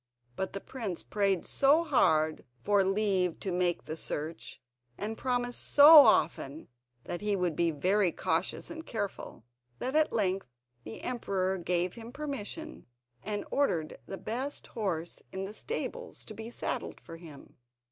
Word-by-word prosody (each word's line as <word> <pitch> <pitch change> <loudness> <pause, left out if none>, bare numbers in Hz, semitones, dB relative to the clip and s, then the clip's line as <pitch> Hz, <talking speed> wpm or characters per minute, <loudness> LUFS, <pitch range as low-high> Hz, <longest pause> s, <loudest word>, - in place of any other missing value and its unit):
But 190 - -3
the 195 - -3
prince 210 -7 -5
prayed 195 -3 0
so 290 +4 +4
hard 160 - +2 0.2
for 200 +10 +3
leave 195 -3 +1
to 190 - -2
make 175 -1 0
the 155 - -5
search, 160 0 -5 0.4
and 215 +2 -3
promised 245 0 -1
so 295 +3 +9
often 155 - +4 0.3
that 175 - -5
he 210 -1 +1
would 180 -4 0
be 170 +1 +2
very 185 +5 +2
cautious 165 +3 -1
and 320 0 -7
careful, 205 - -5 0.3
that 260 - -3
at 310 0 +4
length 195 -4 0 0.4
the 110 - -8
emperor 190 -6 -1
gave 175 +1 0
him 230 0 -9
permission, 295 +2 -6 0.3
and 210 -1 -3
ordered 170 - 0
the 195 - -5
best 255 +8 -4
horse 175 -7 -3
in 190 0 -4
the 200 - -7
stables 480 - -5
to - - -8
be 220 +2 -7
saddled - - -4
for 165 - -11
him. 160 -4 -13
195 Hz, 150 wpm, -30 LUFS, 175-245 Hz, 0.4 s, so